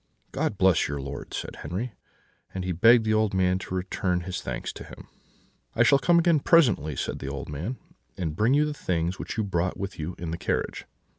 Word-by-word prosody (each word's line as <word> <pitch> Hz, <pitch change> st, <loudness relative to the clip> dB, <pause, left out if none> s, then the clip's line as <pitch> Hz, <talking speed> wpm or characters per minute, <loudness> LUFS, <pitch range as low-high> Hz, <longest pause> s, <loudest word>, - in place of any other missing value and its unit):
"'God 100 Hz, -, -1 dB
bless 95 Hz, -3 st, +4 dB
your 70 Hz, 0 st, -3 dB
lord,' 70 Hz, +1 st, -7 dB
said -, -, -5 dB
Henri; 95 Hz, -, -4 dB, 0.6 s
and 95 Hz, -, -2 dB
he 90 Hz, -, -1 dB
begged 115 Hz, +6 st, +5 dB
the 110 Hz, -, +2 dB
old 110 Hz, -2 st, +2 dB
man 95 Hz, 0 st, +2 dB
to 95 Hz, -, -5 dB
return 90 Hz, -1 st, -1 dB
his 90 Hz, 0 st, -4 dB
thanks -, -, -4 dB
to -, -, -9 dB
him. -, -, -12 dB, 0.7 s
"'I 120 Hz, -, +5 dB
shall 140 Hz, +3 st, +5 dB
come 170 Hz, +4 st, +4 dB
again 170 Hz, -2 st, +4 dB
presently,' 120 Hz, -, +3 dB
said -, -, -3 dB
the 70 Hz, -, -5 dB
old 70 Hz, -1 st, -6 dB
man, 85 Hz, -, -4 dB, 0.4 s
'and 80 Hz, -4 st, -3 dB
bring 115 Hz, -, +3 dB
you 150 Hz, +1 st, +4 dB
the 150 Hz, -, -2 dB
things 90 Hz, -, -2 dB
which -, -, -5 dB
you 110 Hz, -, +1 dB
brought 90 Hz, -2 st, -1 dB
with 95 Hz, -2 st, -5 dB
you 80 Hz, +3 st, -4 dB
in 85 Hz, -2 st, -5 dB
the 85 Hz, -, -4 dB
carriage.' -, -, -2 dB
95 Hz, 215 wpm, -26 LUFS, 85-115 Hz, 0.7 s, begged